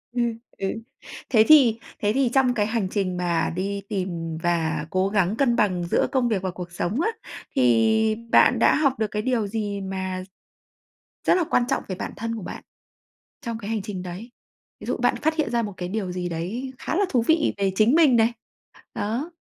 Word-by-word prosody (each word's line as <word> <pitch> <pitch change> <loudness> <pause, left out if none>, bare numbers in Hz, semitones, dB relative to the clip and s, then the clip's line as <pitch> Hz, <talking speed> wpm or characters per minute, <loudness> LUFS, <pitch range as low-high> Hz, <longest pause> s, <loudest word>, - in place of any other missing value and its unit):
Ừ, 245 - +1 0.4
ừ. 195 - -2 0.6
Thế 220 -3 +5
thì 260 -8 +6 0.2
thế 205 - +1
thì 265 0 +2
trong 265 -2 +3
cái 210 -4 +1
hành 220 -3 -1
trình 185 -3 -1
mà 175 -2 0
đi 200 +2 -2
tìm 175 -5 -3
và 160 -3 0
cố 185 +2 +1
gắng 200 -1 +1
cân 250 -4 +2
bằng 185 -5 +1
giữa 170 - +1
công 260 -3 +2
việc 205 -5 0
và 190 -1 -2
cuộc 175 -1 -8
sống 175 - -2
á, 435 - +2 0.5
thì 130 - +3 0.2
bạn - - +5
đã - - +5
học 275 -4 +1
được 220 - +1
cái 210 - -1
điều 230 -3 0
gì 205 -1 -3
mà 190 -1 -4 1.0
rất - - +6
là 365 - +2
quan 245 - +3
trọng 275 - 0
về 185 - -4
bản - - -5
thân 230 +1 -3
của 220 - -7
bạn - - -7 0.8
trong 230 -4 -4
cái 215 -1 -6
hành 220 -2 -1
trình 195 -3 -5
đấy? 185 +7 -8 0.5
Ví - - -9
dụ - - -1
bạn - - +1
phát 315 +1 0
hiện 310 -7 0
ra 235 0 +1
một 205 -3 -5
cái 180 -1 -4
điều 190 -2 -3
gì 180 0 -3
đấy 195 +11 -4
khá - - -3
là 405 - +3
thú 245 -4 +2
vị 320 -1 +3
về 195 -1 +1
chính 220 +6 +4
mình 310 -7 +5
này? 225 +1 +3 0.6
Đó. 235 +11 -2
210 Hz, 210 wpm, -24 LUFS, 185-240 Hz, 1.0 s, thì